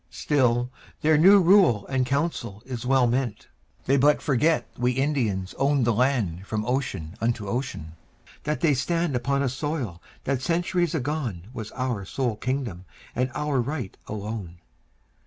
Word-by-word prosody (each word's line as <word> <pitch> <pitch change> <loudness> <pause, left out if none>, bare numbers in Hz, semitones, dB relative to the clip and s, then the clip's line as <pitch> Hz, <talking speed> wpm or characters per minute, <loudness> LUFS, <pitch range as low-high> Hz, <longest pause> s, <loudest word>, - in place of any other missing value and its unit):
Still 125 -4 +1 0.3
their 155 0 +4
new 190 +7 +7
rule 175 - +5
and 130 -2 0
council 130 -7 -2
is 125 -2 -5
well 135 -1 +4
meant. 120 -3 -1 0.4
They 135 - +3
but 145 +2 +4
forget 155 +3 +2
we 125 +1 +1
Indians 120 -9 0
owned 140 -2 +3
the 120 - +3
land 105 -7 0
From 110 -1 -2
ocean 100 - -2
unto 115 -3 -1
ocean; 100 - -3 0.5
that 150 0 -2
they 160 -4 +4
stand 165 +2 0
Upon 140 +3 0
a - - +1
soil 130 - -3 0.2
that 135 -2 -1
centuries 175 +2 0
agone 125 - -3
Was 110 -3 -6
our 125 -6 -2
sole 120 +3 -2
kingdom 125 -10 -3 0.3
and 125 +1 +1
our 150 -4 0
right 125 -5 -4
alone. 105 -4 -5
130 Hz, 150 wpm, -25 LUFS, 110-145 Hz, 0.5 s, new